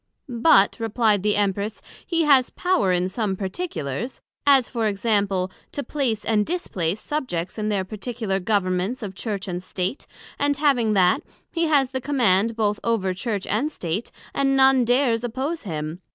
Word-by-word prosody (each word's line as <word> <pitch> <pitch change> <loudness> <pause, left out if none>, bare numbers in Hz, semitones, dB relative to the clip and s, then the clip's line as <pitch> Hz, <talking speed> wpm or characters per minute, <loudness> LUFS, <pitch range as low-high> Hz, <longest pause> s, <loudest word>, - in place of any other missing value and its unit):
But, 235 -5 +4
replied 225 -2 +2
the 210 +1 +1
Empress, 205 +1 -1 0.2
he 335 -2 0
has 275 -4 +5
power 355 - +1
in 180 0 +1
some 195 0 -2
particulars; 195 - -4 0.3
as 270 -4 +6
for 230 -3 -1
example, 200 -3 0 0.2
To 285 - -3
place 245 -9 -2
and 215 -2 +2
displace 205 - -2
Subjects 215 - -3
in 215 0 -1
their 195 -3 0
particular 215 -1 -3
Governments 195 +3 0
of 195 -2 -5
Church 200 -1 -4
and 180 -1 -3
State; 185 +6 -4 0.3
and 285 0 +1
having 260 -7 +2
that, 185 -3 +3 0.3
he 335 -1 0
has 280 -5 +3
the 260 -1 -3
Command 230 -6 +2
both 210 -2 0
over 210 -5 0
Church 200 0 -3
and 255 +10 0
State, 180 - -4 0.2
and 270 0 +2
none 265 -2 +5
dares 245 -1 +2
oppose 265 +8 -3
him. 155 +2 -4
220 Hz, 160 wpm, -23 LUFS, 190-260 Hz, 0.3 s, as